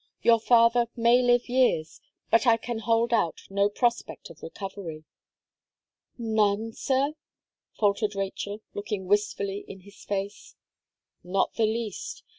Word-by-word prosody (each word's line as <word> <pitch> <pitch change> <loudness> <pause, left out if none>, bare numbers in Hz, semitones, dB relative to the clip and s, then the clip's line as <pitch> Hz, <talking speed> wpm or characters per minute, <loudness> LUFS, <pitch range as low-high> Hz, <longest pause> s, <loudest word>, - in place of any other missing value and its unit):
Your 230 -1 +5
father 235 +1 +4
may 235 +1 +4
live 245 -1 +3
years 245 -11 +1 0.3
but 230 +2 +4
I 230 -1 +6
can 230 0 -5
hold 230 +1 +1
out 190 -8 +1
no 200 +1 +2
prospect 240 +3 -2
of 160 - -16
recovery." 180 -3 -7 1.1
"None, 220 -1 0
sir?" 275 +4 0 0.6
faltered 205 0 +1
Rachel, 200 +2 -4
looking 205 -2 -4
wistfully 200 0 0
in 190 - -10
his 200 +2 -16
face. 200 0 -5 0.7
"Not 190 +2 0
the 225 -2 +2
least. 235 - -4
215 Hz, 125 wpm, -27 LUFS, 200-235 Hz, 1.1 s, I